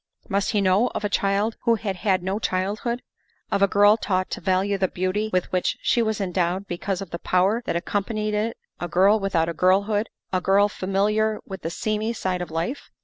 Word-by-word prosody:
Must 200 -1 0
he 210 -3 +1
know 195 +5 +3
of - - -2
a 205 - 0
child 200 +3 0
who 235 -1 +3
had 200 -3 -3
had 185 -1 +1
no 190 +3 -1
childhood? 210 +5 -2 0.5
Of 200 - +1
a 200 - +6
girl 205 +2 +5
taught 185 -4 -1
to - - -4
value 195 +1 +1
the 190 - +2
beauty 185 +5 -1
with 185 -1 0
which 185 -1 0
she 240 - +2
was 220 -2 0
endowed 185 0 -1
because 185 +1 -3
of 195 - -7
the 170 - -4
power 190 +7 +2
that - - -1
ac 170 - -1
companied 215 +1 -1
it 215 +2 -1 0.2
a 175 - -3
girl 195 +5 +4
without 185 -5 +1
a 170 - -2
girlhood 200 +5 +2 0.2
a 185 - +1
girl 200 +3 +4
familiar 210 +3 0
with 190 -1 -7
the 165 - -3
seamy 215 +5 -2
side 185 -5 -2
of 175 - -5
life? 165 - -3
195 Hz, 210 wpm, -24 LUFS, 185-215 Hz, 0.5 s, a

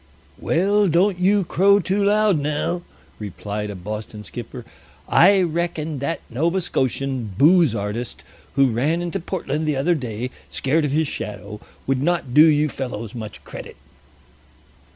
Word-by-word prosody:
"Well, 200 +4 +2
don't 180 +3 +2
you 195 +2 +3
crow 200 +4 +4
too 195 +2 0
loud 205 -3 +3
now," 150 +4 -1 0.4
replied 105 +1 -5
a 100 - -6
Boston 105 +3 -6
skipper. 120 +2 -8 0.4
"I 190 +2 +5
reckon 160 -3 -2
that 150 +5 -2
that - - -18
Nova 170 +7 +1
Scotian 130 - -2
booze 160 - +5
artist, 105 +3 -4 0.3
who 135 -3 +4
ran 150 +9 0
into 170 -2 -3
Portland 155 -4 -3
the 150 - +1
other 140 +6 +2
day 125 -4 -4 0.2
scared 150 +3 +1
of 145 - -1
his 155 +1 +1
shadow, 105 -3 -6 0.3
would 135 -1 0
not 165 -5 0
do 150 +3 +8
you 150 -1 +3
fellows 120 -6 -5
much 110 -3 -8
credit." - - -9
150 Hz, 150 wpm, -22 LUFS, 120-175 Hz, 0.4 s, do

